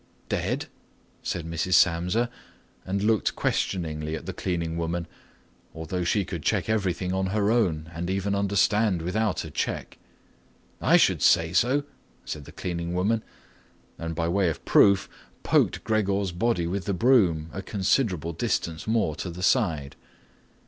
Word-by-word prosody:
"Dead?" - - -1 0.6
said 85 -3 -3
Mrs. 85 +3 0
Samsa 90 +7 +3 0.6
and 100 +1 -1
looked 110 -1 +2
questioningly 80 -4 -1
at - - -7
the - - -4
cleaning 85 -3 -2
woman, 85 +1 -2 0.7
although 80 +3 -3
she 95 +3 +1
could 85 -2 -5
check - - 0
everything 95 -4 0
on 95 0 0
her 105 +2 +1
own 80 -9 +1
and 85 +2 -4
even 95 +1 -1
understand 100 -1 +2
without 105 +3 -1
a - - -8
check. - - -3 0.8
"I - - +5
should - - +3
say 80 0 +4
so," 130 +9 +3 0.4
said 75 -2 -6
the - - -11
cleaning 85 -1 -4
woman 105 +5 +1 0.8
and, 80 -1 -4
by 85 0 0
way 90 +1 +2
of 80 - -6
proof, 100 -2 +5 0.4
poked - - +2
Gregor's 100 -3 0
body 90 -1 0
with 90 +1 -3
the 100 - -1
broom 90 -9 +3
a 95 - -4
considerable 95 - 0
distance 80 +1 -2
more 110 -9 +1
to 90 - -4
the 90 +2 -7
side. 85 - +1
90 Hz, 150 wpm, -26 LUFS, 85-100 Hz, 0.8 s, I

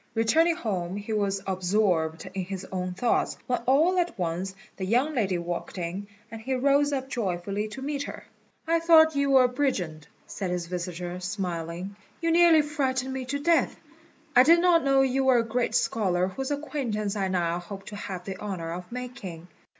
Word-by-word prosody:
Returning 320 +10 +3
home 190 - -3
he 205 +2 -4
was 200 -2 0
absorbed 185 -4 0
in 190 -1 -2
his 190 0 -6
own 180 -1 -3
thoughts, 240 +3 +1
when 250 - 0
all 320 +8 +4
at 345 -9 -1
once 180 +2 -2 0.2
the 190 - -4
young 250 +10 +1
lady 195 -9 0
walked 175 +2 -5
in, 180 +3 -4 0.2
and 225 -1 -7
he 260 +3 -1
rose 280 +2 +3
up 265 -2 -2
joyfully 200 -3 -2
to 265 +5 -8
meet 285 0 -2
her. 285 - -6 0.4
"I 335 +1 +3
thought 320 -2 +6
you 280 0 +1
were 265 -2 +6
a - - +5
brigand," 195 - -2 0.2
said 190 -3 -4
his 180 -1 -2
visitor, 175 0 -5
smiling; 180 -1 -4 0.2
"you 330 -1 0
nearly 335 -2 +6
frightened 265 -3 -1
me 265 -1 -4
to 275 +3 -2
death. 325 +3 +2 0.6
I 250 - +9
did 330 +6 +6
not 345 -2 +4
know 275 -1 +4
you 265 0 +1
were 260 -2 +5
a 230 - +3
great 240 +2 -1
scholar 185 -4 +1
whose 265 +8 -4
acquaintance 260 -9 -2
I 195 -2 0
now 175 -2 0
hope 195 +3 -9
to 210 - -8
have 190 -3 -6
the 190 -1 -6
honour 180 -5 -4
of 180 +3 -8
making." 235 -9 -7
215 Hz, 190 wpm, -27 LUFS, 180-270 Hz, 0.6 s, I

